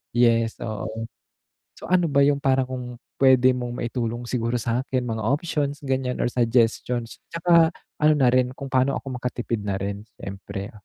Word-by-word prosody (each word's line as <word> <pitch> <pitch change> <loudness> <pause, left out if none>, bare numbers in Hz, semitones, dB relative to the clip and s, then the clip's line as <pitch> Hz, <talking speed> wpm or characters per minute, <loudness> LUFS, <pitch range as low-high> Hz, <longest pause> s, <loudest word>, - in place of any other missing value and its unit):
yes 115 -1 +3
oo, 110 0 -4 0.7
so - - -9
ano 180 -2 +4
ba 140 - +3
yung 140 0 +2
parang 130 -1 +2
kung 130 -1 -4 0.3
pwede 130 -1 +6
mong 120 -1 -4
maitulong 120 0 -3
siguro 120 -1 -1
sa 115 +2 0
akin 130 -2 -1
mga 110 -1 -2
options 145 +2 -1
ganyan 130 -2 -1
or - - +2
suggestions, 120 0 +1
tsaka 170 -1 +5 0.3
ano 155 0 +6
na 130 -4 +4
rin 125 0 +3
kung 140 -1 -7
paano 130 +1 +2
ako 130 -2 -6
makatipid 120 -2 -3
na 100 -1 -1
rin 100 +1 -4 0.2
siyempre? 100 +2 -6
125 Hz, 165 wpm, -24 LUFS, 115-135 Hz, 0.7 s, pwede